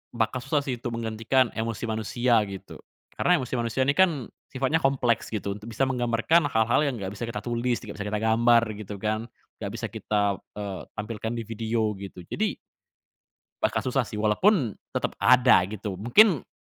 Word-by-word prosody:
bakal 115 +2 0
susah 140 +3 0
sih 130 -4 -3
itu 120 - -5
menggantikan 115 +2 0
emosi 115 0 -4
manusia 115 +2 +1
gitu, 95 -1 -9 0.4
karena - - +4
emosi 125 - -7
manusia 115 +3 0
ini 140 - +3
kan 155 -6 +2 0.2
sifatnya 135 +4 0
kompleks 130 -6 +1
gitu, 100 -2 -3
untuk 105 - -12
bisa 115 +3 -1
menggambarkan 130 +5 +2
hal-hal 120 +4 +2
yang 130 - -1
enggak 95 - -4
bisa 110 +3 -5
kita 105 -2 -5
tulis, 120 0 0
enggak 105 - -8
bisa 105 - -3
kita 105 0 -1
gambar 115 +1 +4 0.2
gitu 105 -1 -6
kan, 110 +2 -1 0.4
enggak - - -4
bisa - - -3
kita, 100 -2 0 0.2
eee, 100 -3 -5
tampilkan 110 +2 -4
di 115 - -3
video 115 0 -1
gitu. 100 -2 -9
Jadi - - 0 1.1
Bakal - - +1
susah - - 0
sih - - -9
walaupun 115 - +2 0.2
tetap - - -2
ada 125 -7 +5
gitu. 100 -2 -6
Mungkin, 155 - +5
115 Hz, 175 wpm, -26 LUFS, 105-130 Hz, 1.1 s, ada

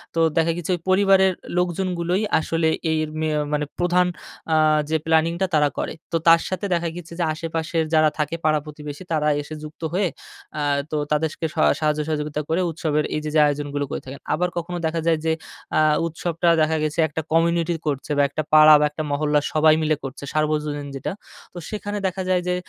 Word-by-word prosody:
তো - - +1 0.2
দেখা 165 0 +3
গিয়েছে 175 - -6
ওই - - -8
পরিবারের 190 0 +4 0.2
লোকজনগুলোই 180 +1 0 0.2
আসলে 165 0 0 0.2
এই 155 -1 0
মে 160 - 0
আ - - +1
মানে 150 0 0
প্রধান 180 +1 +3 0.5
আ - - +4 0.3
যে 160 - +1
প্ল্যানিংটা 165 +3 +2
তারা 150 -1 +4
করে। - - -2 0.2
তো 165 - +2
তার 165 0 +7
সাথে 185 +1 -3
দেখা 170 -1 0
গেছে 170 -1 -9
যে, - - +2
আশেপাশের 165 0 -2
যারা 155 -1 +5
থাকে 150 +2 -1
পাড়া 155 -1 +3
প্রতিবেশী, 150 +2 -8
তারা 150 -1 +1
এসে 155 +2 -8
যুক্ত 155 +2 -10
হয়ে 190 +1 +2 0.5
আ - - -1 0.3
তো 155 - -1 0.2
তাদেরকে 155 +1 0
স - - -22 0.2
সাহায্য 155 -1 +1
সহযোগিতা 150 -1 -2
করে, 165 +3 +1
উৎসবের 150 -1 -1
এইযে, 150 0 -3
যে - - +5
আয়োজনগুলো 145 0 -1
করে - - -3
থাকেন। 135 +1 -8
আবার 180 +3 0
কখনো 175 +1 -5
দেখা 165 +1 -2
যায় 165 -1 +3
যে 160 - +2 0.5
আ - - +5 0.3
উৎসবটা 170 +1 -1
দেখা 155 +1 +2
গেছে 155 +2 -2
একটা 160 +1 -4
কমিউনিটি 170 +1 +2
করছে 145 0 -2
বা 145 - +5
একটা 155 +2 -3
পাড়া 155 0 +9
বা 150 - +3
একটা 150 +1 -5
মহল্লা 150 +1 +2
সবাই 155 0 +5
মিলে 155 0 +2
করছে, 135 +1 -7
সার্বজনীন 150 -1 -1
যেটা। 135 - -4 0.4
তো - - -10
সেখানে 205 -1 -4
দেখা 190 +1 -4
যায় 180 -1 +2
যে 180 - +1
160 Hz, 195 wpm, -22 LUFS, 150-170 Hz, 0.5 s, পাড়া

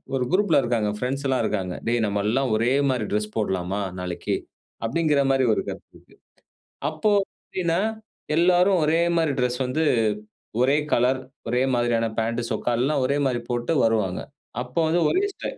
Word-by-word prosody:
ஒரு 130 - +1
குரூப்ல 185 -7 +4
இருக்காங்க. 115 -3 0
பிரெண்ட்ஸ் 135 +4 -2
எல்லாம் 130 -3 +1
இருக்காங்க. 95 -4 -2
"டேய் 120 -1 +1
நம்ம 100 0 -1
எல்லாம் 130 +3 +1
ஒரே 120 +3 +1 0.2
மாதிரி 120 -5 -1
டிரெஸ் 105 0 -1
போடலாமா 95 -1 -1 0.2
நாளைக்கு." 90 -1 -2 0.5
அப்படிங்கிற 150 +3 +2
மாதிரி 135 -1 +2
ஒரு - - -1
கருத்து - - -9
இருக்கு. - - -23 0.8
அப்போ 155 +7 0 0.3
எப்படின்னா, 170 -2 -1 0.6
எல்லாரும் 180 +2 +4
ஒரே 160 +2 +3 0.2
மாதிரி 160 -3 +2
டிரெஸ் 125 0 0
வந்து 130 +6 0 0.8
ஒரே 135 +3 +4 0.2
கலர், 125 +2 +3 0.3
ஒரே 125 +2 +1
மாதிரியான 120 -1 +1
பாண்ட் 115 +1 0
சொக்க 120 - 0
எல்லாம் 135 +3 +1
ஒரே 140 +2 +1
மாதிரி 125 -3 0
போட்டு 120 +5 -1
வருவாங்க. 105 -5 +1 0.4
அப்போ 125 +3 -9
வந்து 170 +2 +2
ஒரே 375 - +2
ஸ்டைல். - - -6
125 Hz, 160 wpm, -24 LUFS, 115-150 Hz, 0.8 s, குரூப்ல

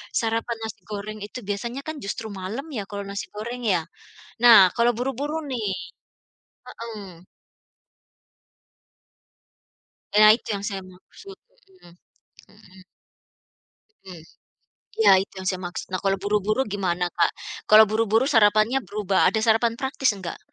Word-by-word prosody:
sarapan 230 +1 -1
nasi 220 -1 -6
goreng 210 +1 -6
itu 210 +4 -8
biasanya 235 +7 -4
kan 315 0 -6
justru 220 0 -5
malam 200 +7 -5
ya 210 -7 -5
kalo 200 0 -6
nasi 200 0 -6
goreng 235 +3 -5
ya? 180 -5 +2 0.6
Nah 225 -6 +9
kalo 235 +1 +3
buru-buru 270 +5 -3
nih 245 -5 -3 1.0
heeh. 200 -7 -10 2.9
Nah 215 0 +9
itu 230 - -8
yang 200 0 -5
saya 195 -2 -4
maksud, 190 - -15 0.3
mhm 365 - -19 0.6
mhm. 190 -3 -18 1.3
Mmm, 180 -4 -10 0.8
iya 445 - +6
itu 195 - -12
yang 190 - -7
saya 185 -1 -2
maksud 175 - -6
nah 185 - -1
kalo 195 0 +2
buru-buru 210 +3 0
gimana 180 -3 -1
Kak? 175 - +3 0.4
Kalo 215 +1 +10
buru-buru 225 +2 +2
sarapannya 215 +1 +4
berubah 200 0 -1
ada 220 - -1
sarapan 225 +1 +3
praktis 270 0 +1
enggak? 185 -3 -7
215 Hz, 130 wpm, -24 LUFS, 195-235 Hz, 2.9 s, Kalo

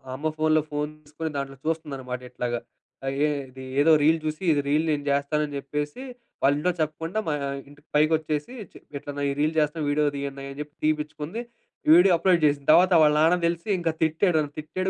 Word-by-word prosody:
అమ్మ 150 +4 -2
ఫోనులో, 155 0 +3
ఫోన్ 150 0 -2
తిసుకోని 155 +2 -5
దాంట్లో 135 0 -5
చూస్తుందన్నమాట 135 -6 -3
ఇట్లాగా. 120 -1 -2 0.5
ఆ - - -3 0.2
ఏ - - +3 0.2
ఇది, 130 +1 -11 0.2
ఏదో 160 +3 +5
రీల్ 160 +2 +4
జూసి. 155 +3 -4
ఇది 145 - +1
రీల్ 150 +2 +3
నేను 145 -1 -1
జేస్తాను 140 +2 +1
అని 145 -1 -7
జెప్పేసి. 150 - -4 0.4
వాళ్ళింట్లో 145 +6 +3
చెప్పకుండా 160 +6 -2
మా 155 - +1
ఆహ్, 140 - -3
ఇంటికి 145 +1 -19
పైకొచ్చేసి, 155 +4 +1 0.2
చె - - -14 0.2
ఇట్లా 145 - -7
నా 145 - -2
ఈ - - -1
రీల్ 155 +2 +1
జేస్తన్నా 150 0 0
వీడియో 150 +1 +2
తీయన్నయ్య, 140 0 -5
అని 140 - -12
జెప్పి 150 0 -9
తిపిచ్చుకుంది. 155 +6 -2 0.5
వీడియో 180 +2 +7
అప్లోడ్ 175 0 +3
జేసింది. 145 -1 +1
తర్వాత 180 +3 +6
వాళ్ళ 150 -1 +5
నాన్నకు 170 +2 +3
తెలిసి 170 +3 -3
ఇంక 170 -1 0
తిట్టాడు. 160 +2 +2
నన్ను 145 -1 -3
తిట్టాడు, 185 +5 -3
150 Hz, 190 wpm, -25 LUFS, 145-160 Hz, 0.5 s, వీడియో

